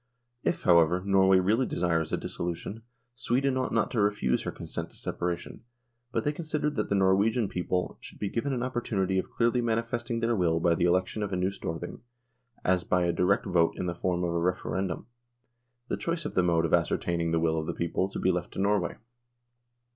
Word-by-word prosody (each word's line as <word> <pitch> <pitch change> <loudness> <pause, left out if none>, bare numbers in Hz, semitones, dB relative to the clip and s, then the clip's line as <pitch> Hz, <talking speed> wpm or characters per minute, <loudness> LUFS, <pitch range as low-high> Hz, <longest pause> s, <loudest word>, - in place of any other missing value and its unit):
If, - - 0
however, 85 0 +4
Norway 95 -1 +5
really 110 +8 +2
desires 85 -3 0
a - - +1
dis - - -6
solution, 90 +6 -4 0.3
Sweden 130 +3 0
ought 130 -1 -1
not 110 -2 +1
to 115 - +1
refuse 100 -12 +1
her - - -3
consent - - -6
to - - -15
separation, 85 -1 -4 0.5
but - - 0
they 145 - +1
considered 150 -1 -2
that - - -1
the 100 - +2
Norwegian 100 +4 +3
people 90 0 -2
should - - -11
be 105 - -2
given 120 +7 -2
an 125 -2 -1
opportunity 100 -7 0
of - - -4
clearly 120 +1 +1
manifesting 115 +1 -1
their 115 0 +1
will 85 -4 +2
by 85 0 +3
the 85 - +1
election 90 +4 +1
of 100 -1 -2
a - - 0
new 90 +2 +1
Storthing, 85 -2 -6 0.6
as 90 -1 +3
by 90 0 +1
a 85 - +1
direct 90 +4 +2
vote 85 -4 +2
in - - -2
the 85 - -1
form 90 +1 -1
of 85 -1 0
a 85 - +1
Referendum, 90 0 -1 0.8
the - - -2
choice 170 -1 -2
of - - -3
the 90 - +3
mode 85 -2 +2
of 80 - -2
ascertaining 85 -1 +1
the 80 0 +2
will 80 -1 +1
of 80 - -4
the - - 0
people 85 +3 -1
to - - -6
be 95 - +2
left 90 -1 -3
to - - -5
Norway. 100 -3 +1
95 Hz, 205 wpm, -28 LUFS, 85-115 Hz, 0.8 s, Norway